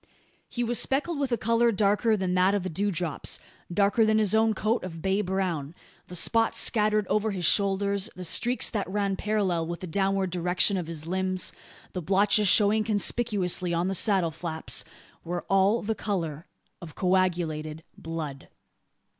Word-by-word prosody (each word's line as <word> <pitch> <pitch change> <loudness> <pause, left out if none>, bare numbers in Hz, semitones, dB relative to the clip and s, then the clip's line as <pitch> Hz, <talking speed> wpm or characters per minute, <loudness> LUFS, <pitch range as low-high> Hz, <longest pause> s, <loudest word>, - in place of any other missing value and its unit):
He 240 - -2
was 240 0 0
speckled 295 +3 0
with 275 -3 -1
a 235 - +2
colour 230 +2 +2
darker 210 +2 +2
than 185 -2 -1
that 185 +2 +3
of 200 - -1
the 185 - -3
dewdrops 175 -3 -2 0.3
darker 200 +5 +3
than 220 0 +3
his 215 -2 +2
own 220 0 +3
coat 220 +4 0
of 170 -3 -7
bay 190 +4 0
brown. 180 -6 -2 0.3
The 180 - -8
spots 225 +6 +1
scattered 215 -2 +2
over 210 +3 0
his 185 -4 -2
shoulders 200 +1 +1
the 185 - -7
streaks 240 +8 +1
that 205 -5 -2
ran 200 0 -1
parallel 190 -6 -1
with 170 0 -5
the - - -4
downward 195 +1 0
direction 180 +3 +1
of 180 -4 -3
his 160 -2 -7
limbs, 185 +1 -1 0.4
the 180 - -3
blotches 200 +4 +3
showing 210 +2 +4
conspicuously 205 -4 +1
on 175 +3 0
the - - -1
saddle 190 -3 +2
flaps, 160 0 -4 0.4
were 175 +1 -4
all 195 +3 +4
of 230 - -7
the 220 - 0
colour 175 -7 -4 0.3
of 165 -4 -10
coagulated 170 -4 0
blood. 160 -4 -6
195 Hz, 170 wpm, -27 LUFS, 175-210 Hz, 0.4 s, showing